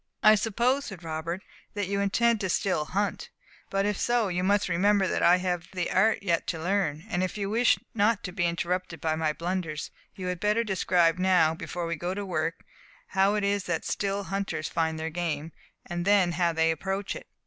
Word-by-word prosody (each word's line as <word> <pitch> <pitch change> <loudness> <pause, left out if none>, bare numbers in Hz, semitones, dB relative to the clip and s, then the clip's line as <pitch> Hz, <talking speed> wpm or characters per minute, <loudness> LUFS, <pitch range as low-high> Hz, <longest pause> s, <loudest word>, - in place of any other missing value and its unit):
"I 215 - +8
suppose," 235 +6 +1
said 190 -5 -8
Robert, 165 +3 -4 0.3
"that 205 -1 -1
you 200 +1 -1
intend 225 +3 +2
to 190 - -1
still 180 -4 0
hunt. 200 +5 -2 0.4
But 195 0 0
if 205 -1 -1
so, 240 -4 +1
you 180 0 -1
must 200 +2 +2
remember 195 +2 +3
that - - -1
I 175 +1 +6
have 180 -2 -2
the 180 -2 -2
art 220 -2 +3
yet 170 -4 0
to 165 - -2
learn; 170 -3 -1
and 180 -5 -1
if 185 +2 -2
you 200 -1 -2
wish 235 +2 +4 0.2
not 220 0 +2
to 180 - -4
be 175 -2 0
interrupted 175 0 -2
by 155 +1 0
my 160 -1 0
blunders, 170 -1 -3 0.2
you 190 -3 -6
had 180 -1 -2
better 210 +4 +2
describe 180 -4 +2
now, 180 -4 +4
before 170 +1 -5
we 170 0 -2
go 175 +4 -3
to 205 0 -4
work, 165 -3 -2 0.5
how 195 +1 +3
it 210 - 0
is 200 -1 0
that 170 -2 -2
still 200 0 -1
hunters 195 -5 -3
find 160 -1 -1
their 160 +1 -3
game, 160 -2 -3 0.3
and 175 -1 -3
then 195 -2 +4
how 170 0 +1
they 165 0 +2
approach 195 +4 -3
it." - - -9
185 Hz, 205 wpm, -27 LUFS, 170-200 Hz, 0.5 s, I